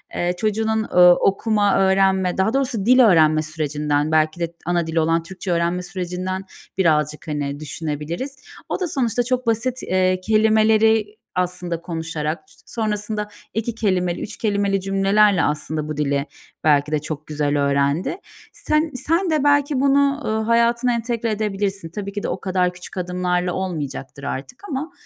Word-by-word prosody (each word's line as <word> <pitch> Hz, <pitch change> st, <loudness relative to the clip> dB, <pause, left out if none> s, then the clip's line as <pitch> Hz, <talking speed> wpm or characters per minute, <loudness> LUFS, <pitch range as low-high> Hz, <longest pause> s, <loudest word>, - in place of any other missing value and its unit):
eee, 175 Hz, 0 st, 0 dB
çocuğunun, 220 Hz, +2 st, 0 dB
eee, 180 Hz, -, 0 dB
okuma, 195 Hz, +3 st, +4 dB
öğrenme, 190 Hz, -1 st, +2 dB
daha 190 Hz, +4 st, +1 dB
doğrusu 255 Hz, -7 st, -1 dB
dil 255 Hz, +3 st, +5 dB
öğrenme 160 Hz, -9 st, +5 dB
sürecinden, 150 Hz, -1 st, -1 dB
belki 155 Hz, +1 st, +2 dB
de 170 Hz, -1 st, -2 dB
ana 175 Hz, -1 st, 0 dB
dili 165 Hz, 0 st, 0 dB
olan 165 Hz, +1 st, +1 dB
Türkçe 185 Hz, +1 st, -6 dB
öğrenme 170 Hz, +1 st, 0 dB
sürecinden 185 Hz, +1 st, -4 dB, 0.3 s
birazcık, 150 Hz, -4 st, +1 dB
hani, 145 Hz, -2 st, -3 dB
düşünebiliriz. 155 Hz, -, -4 dB, 0.3 s
O -, -, -2 dB
da 370 Hz, -, -1 dB
sonuçta 245 Hz, -6 st, 0 dB
çok 250 Hz, 0 st, -1 dB
basit, 240 Hz, +3 st, 0 dB
eee, 185 Hz, 0 st, +1 dB
kelimeleri 220 Hz, +1 st, +4 dB, 0.3 s
aslında 180 Hz, -2 st, -2 dB
konuşarak, 160 Hz, -2 st, -3 dB, 0.3 s
sonrasında 210 Hz, -1 st, -3 dB, 0.3 s
2 225 Hz, +1 st, -2 dB
kelimeli, 185 Hz, -5 st, 0 dB
3 220 Hz, -, -6 dB
kelimeli 200 Hz, -2 st, 0 dB
cümlelerle 195 Hz, 0 st, +3 dB
aslında 150 Hz, +1 st, -2 dB
bu 155 Hz, -1 st, -5 dB
dili 140 Hz, -1 st, 0 dB, 0.4 s
belki 150 Hz, -1 st, +3 dB
de 155 Hz, -, +1 dB
çok 150 Hz, 0 st, -6 dB
güzel 145 Hz, -1 st, -1 dB
öğrendi. 140 Hz, -, 0 dB, 0.4 s
Sen 305 Hz, +1 st, 0 dB
sen 335 Hz, +8 st, 0 dB
de 310 Hz, -3 st, +1 dB
belki 285 Hz, -1 st, +3 dB
bunu, 280 Hz, +1 st, +3 dB
eee, 215 Hz, -, -1 dB
hayatına 235 Hz, +2 st, +2 dB
entegre 235 Hz, -1 st, -2 dB
edebilirsin. 200 Hz, -4 st, -2 dB
Tabii 200 Hz, +3 st, -5 dB
ki 205 Hz, -, -4 dB
de -, -, -1 dB
o -, -, -3 dB
kadar 180 Hz, -1 st, 0 dB
küçük 175 Hz, +2 st, -11 dB
adımlarla 180 Hz, 0 st, -1 dB
olmayacaktır 145 Hz, -7 st, -5 dB
artık 140 Hz, -, -6 dB
ama, 300 Hz, +3 st, -3 dB
185 Hz, 150 wpm, -21 LUFS, 160-220 Hz, 0.4 s, dil